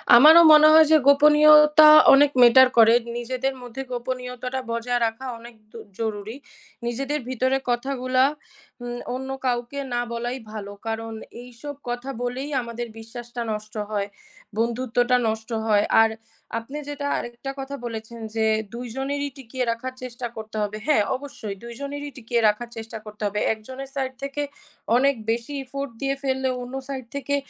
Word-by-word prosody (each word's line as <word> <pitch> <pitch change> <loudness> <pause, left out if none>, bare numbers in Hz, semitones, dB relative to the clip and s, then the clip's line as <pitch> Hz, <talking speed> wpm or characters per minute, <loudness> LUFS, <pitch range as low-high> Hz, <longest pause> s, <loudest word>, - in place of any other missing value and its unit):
আমারও 315 +7 +9
মনে 305 0 +8
হয় 315 0 +8
যে 315 - +8
গোপনীয়তা 300 +1 +7 0.3
অনেক 285 +1 +6
matter 245 +2 +8
করে। 225 0 +7 0.2
নিজেদের 255 +3 -2
মধ্যে 245 +2 -7
গোপনীয়তাটা 250 +1 -4
বজায় 240 +1 -1
রাখা 225 +4 -4
অনেক 235 0 -13 0.2
দ - - -20 0.2
জরুরি। 220 0 -4 0.5
নিজেদের 275 +5 -2
ভিতরে 260 +1 +1
কথাগুলা 255 +1 0 0.6
উ - - -5 0.3
অন্য 265 +1 -6 0.2
কাউকে 245 +2 -2
না 240 - 0
বলাই 240 +2 -3
ভালো। 205 -2 -7
কারণ 225 0 -4 0.3
এইসব 250 +4 -9
কথা 245 +2 -4
বলেই 255 +4 -4
আমাদের 235 0 -6
বিশ্বাসটা 240 +2 -8
নষ্ট 215 0 -6 0.2
হয়, 200 -1 -1 0.5
বন্ধুত্বটা 245 +2 +1
নষ্ট 220 +1 -3 0.2
হয়। 210 -2 +3 0.2
আর 225 - +4 0.5
আপনি 265 +6 -9
যেটা 285 -1 -4
আরেকটা 240 +3 -6
কথা 270 +1 -5
বলেছেন 230 0 -7 0.2
যে 220 -1 +1 0.3
২ 240 +1 -6
জনেরই 285 +1 -2
টিকিয়ে 255 0 -4
রাখার 255 +3 -5
চেষ্টা 245 -1 -5
করতে 220 0 -8
হবে। 210 0 -3
হ্যাঁ, 290 -9 +4
অবশ্যই 255 -7 -7
২ 235 0 -8
জনেরই 285 +1 -5
টিকিয়ে 235 -1 -1
রাখার 215 +3 -1
চেষ্টা 225 0 -7
করতে 210 0 -12
হবে। 205 +1 -3
একজনের 260 +5 -9
side 260 -1 -3
থেকে 275 +1 -3 0.6
অনেক 275 +2 +3 0.2
বেশি 235 +5 -3
effort 275 +1 -6
দিয়ে 275 0 0
ফেললে 265 -1 0
অন্য 245 +1 -8 0.2
side 260 -3 -6
থেকে 280 0 -1
245 Hz, 155 wpm, -23 LUFS, 230-270 Hz, 0.6 s, আমারও